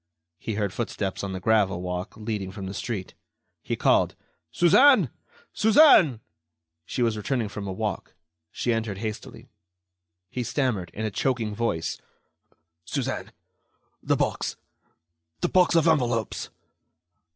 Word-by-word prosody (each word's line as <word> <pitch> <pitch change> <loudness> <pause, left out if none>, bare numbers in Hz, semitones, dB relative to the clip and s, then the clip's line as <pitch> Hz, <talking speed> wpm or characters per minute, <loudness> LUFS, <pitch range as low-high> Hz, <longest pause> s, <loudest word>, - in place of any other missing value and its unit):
He 110 - -4
heard 100 -3 -1
footsteps 100 -5 -3
on 100 - -3
the 95 - -4
gravel 100 -3 +2
walk 90 0 -4
leading 105 -3 -4
from 100 0 -7
the 95 - -5
street. 100 -4 -4 0.5
He - - -3
called: - - +2 0.4
"Suzanne! 255 - +5 0.4
Suzanne!" 210 - +6 0.7
She 125 - -1
was 115 -2 +1
returning 110 +1 -2
from 100 -1 -6
a - - -3
walk. 105 0 -4 0.3
She 120 - -1
entered 110 -3 -2
hastily. 110 0 -6 0.8
He 125 - -3
stammered, 120 - -1
in 110 - -3
a 110 - -2
choking 115 0 -1
voice: 105 -7 -2 0.8
"Suzanne... - - -3 0.7
the - - +1
box... - - -1 0.9
the - - +1
box 180 -2 +4
of 165 0 +4
envelopes?" 120 -8 0
110 Hz, 130 wpm, -26 LUFS, 100-125 Hz, 0.9 s, Suzanne